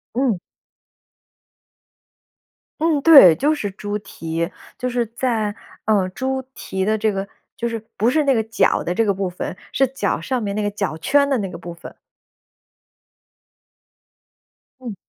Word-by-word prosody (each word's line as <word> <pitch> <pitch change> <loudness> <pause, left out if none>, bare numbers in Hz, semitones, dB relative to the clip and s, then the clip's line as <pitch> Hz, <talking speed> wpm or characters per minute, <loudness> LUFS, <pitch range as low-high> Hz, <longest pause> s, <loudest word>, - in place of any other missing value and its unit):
嗯。 245 -8 +1 2.4
嗯， 315 -3 +2
对。 275 - +9
就 300 - +1
是 205 -8 -3
猪 205 +1 -4
蹄， 165 -3 -4 0.3
就 250 0 -2
是 240 -1 0
在 225 -2 -1 0.3
呃， 200 -4 +2
猪 265 +6 -2
蹄 190 0 -4
的 215 +2 +1
这 215 0 +1
个 195 0 -3 0.3
就 235 0 -2
是 230 -1 -3 0.2
不 225 +4 +3
是 305 +3 +2
那 275 - +4
个 220 -2 +1
脚 225 +1 +1
的 175 - -1
这 225 +4 +1
个 200 - +2
部 190 -1 -2
分， 180 +1 -5 0.2
是 270 0 +2
脚 265 +2 -1
上 255 -2 -2
面 200 0 -3
那 215 - -1
个 205 - +1
脚 200 -6 -3
圈 280 - +2
的 270 - +2
那 195 -3 -3
个 170 - -8
部 175 0 -8
分。 170 - -12 2.9
嗯。 235 -5 -6
220 Hz, 165 characters per minute, -21 LUFS, 195-260 Hz, 2.9 s, 对